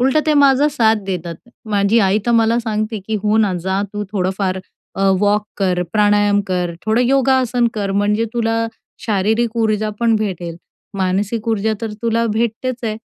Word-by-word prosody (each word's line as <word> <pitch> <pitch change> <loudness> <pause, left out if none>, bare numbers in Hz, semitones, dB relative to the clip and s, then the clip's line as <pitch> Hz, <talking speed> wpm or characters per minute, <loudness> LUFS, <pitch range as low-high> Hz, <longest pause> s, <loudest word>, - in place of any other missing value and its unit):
उलटं, 265 +4 +3
ते 305 - +3
माझा 280 0 +4
साथ 225 -6 +3
देतात. 175 -3 -4 0.4
माझी 205 +2 +3
आई 195 0 +3
तर 240 - +2
मला 230 0 +3
सांगते, 215 -1 -2
की 220 - -2
"हो 215 +1 +2
ना, 210 -3 +2
जा 190 +1 0
तू 210 0 -3
थोडंफार 190 0 -1 0.4
अ, - - -5 0.2
वॉक 205 0 +2
कर, 180 -3 0
प्राणायाम 205 -1 +3
कर, 180 -2 -1
थोडं 220 +2 +2
योगासन 260 -2 +2
कर, 200 -2 -2
म्हणजे 210 +2 +1
तुला 230 -1 0 0.4
शारीरिक 220 +3 0
ऊर्जा 215 -1 0
पण 230 -1 +3
भेटेल, 175 -6 -4 0.4
मानसिक 200 +4 -1
ऊर्जा 220 0 +1
तर 220 -2 -4
तुला 230 0 +1
भेटतेच 235 +3 -2
आहे. 215 -1 -2
215 Hz, 165 wpm, -18 LUFS, 200-230 Hz, 0.4 s, माझा